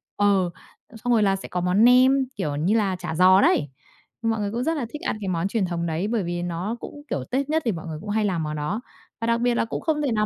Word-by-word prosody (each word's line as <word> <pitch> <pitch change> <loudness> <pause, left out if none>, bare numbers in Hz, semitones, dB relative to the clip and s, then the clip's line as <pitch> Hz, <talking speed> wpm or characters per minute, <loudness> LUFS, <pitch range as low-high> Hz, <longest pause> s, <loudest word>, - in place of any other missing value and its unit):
ờ, 200 -3 +3 0.5
xong 245 0 +2
rồi 220 -2 +4
là 195 -1 +3
sẽ 195 - -7
có 180 - -3
món 180 +5 +3
nem, 260 +2 +6
kiểu 145 -2 -2
như 175 +9 +1
là, 200 -4 +1
chả 175 -2 -5
giò 185 +2 +6
đấy, 145 -2 +3 0.5
mọi 225 -1 0
người 205 -1 -2
cũng 240 +2 -2
rất 320 +1 0
là 250 - -2
thích 300 - -8
ăn 225 - -2
cái 195 - -4
món 175 0 0
truyền 200 -1 0
thống 170 -1 -2
đấy 165 +5 -1
bởi 220 -4 0
vì 175 0 -3
nó 175 +7 -3
cũng, 290 - -9
kiểu, 130 - -2
Tết 275 +3 0
nhất 320 +1 +2
thì 225 - +2
mọi 170 -1 -6
người 155 - -5
cũng 210 - -8
hay 215 0 +1
làm 175 -5 0
món 150 0 -3
đó. 180 +10 -2 0.4
Và 230 - -1
đặc 235 0 +1
biệt 245 -1 +2
là - - +1
cũng - - -4
không 310 -2 0
thể 280 - 0
nào 210 -1 +1
205 Hz, 285 wpm, -24 LUFS, 175-235 Hz, 0.5 s, nem